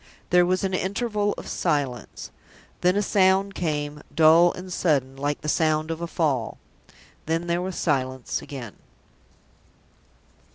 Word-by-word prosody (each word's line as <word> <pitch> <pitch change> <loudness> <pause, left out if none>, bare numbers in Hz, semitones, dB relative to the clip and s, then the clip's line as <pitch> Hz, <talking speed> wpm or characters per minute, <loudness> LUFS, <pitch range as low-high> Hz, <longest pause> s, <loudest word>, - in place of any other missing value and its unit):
There 180 0 +5
was 185 +1 0
an 190 -1 -1
interval 205 +2 -1
of - - -8
silence. 135 -5 -2 0.5
Then 180 +1 +3
a 205 - +1
sound 195 0 +3
came 150 -4 -3
dull 160 +3 +6
and 180 0 -8
sudden, 135 -7 +1
like 145 +1 -2
the - - -6
sound 155 0 +1
of 165 +1 -5
a 170 - -2
fall. 140 -9 -1 0.7
Then 165 +1 0
there 170 +1 0
was 185 0 -4
silence 130 -4 -1
again. 125 -7 -8
165 Hz, 135 wpm, -24 LUFS, 145-185 Hz, 0.7 s, dull